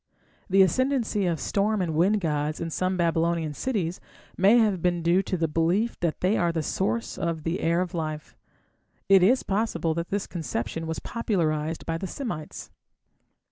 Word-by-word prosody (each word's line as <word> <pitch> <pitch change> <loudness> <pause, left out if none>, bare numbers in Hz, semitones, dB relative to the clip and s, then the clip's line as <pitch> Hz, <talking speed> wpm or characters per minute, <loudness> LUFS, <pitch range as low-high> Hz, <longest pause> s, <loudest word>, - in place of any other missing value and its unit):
The 195 +1 +6
ascendancy 240 -3 +1
of 165 -3 -1
storm 210 +7 0
and 175 -4 -1
wind 195 +7 +2
gods 150 -2 -1
in 165 -1 -4
some 185 +3 -1
Babylonian 165 -2 +1
cities 185 - -2 0.3
may 200 +6 +5
have 210 -6 +2
been 175 -1 0
due 175 +3 +4
to 185 - -3
the 165 -1 +1
belief 170 +9 0
that 170 -3 -2
they 190 +4 +2
were 175 -1 +2
the 160 -2 -2
source 215 +9 -2
of 165 -2 -2
the 165 +3 -1
"air 170 +2 +1
of 180 -2 -3
life". 155 -3 -4 0.7
It 195 -1 +7
is 240 +8 +4
possible 190 -6 0
that 170 +1 -4
this 200 0 -1
conception 160 -2 -4
was 160 - -3
popularized 160 -9 -2
by 165 0 -2
the 190 - -4
Semites. 195 - -6
175 Hz, 175 wpm, -26 LUFS, 165-195 Hz, 0.7 s, It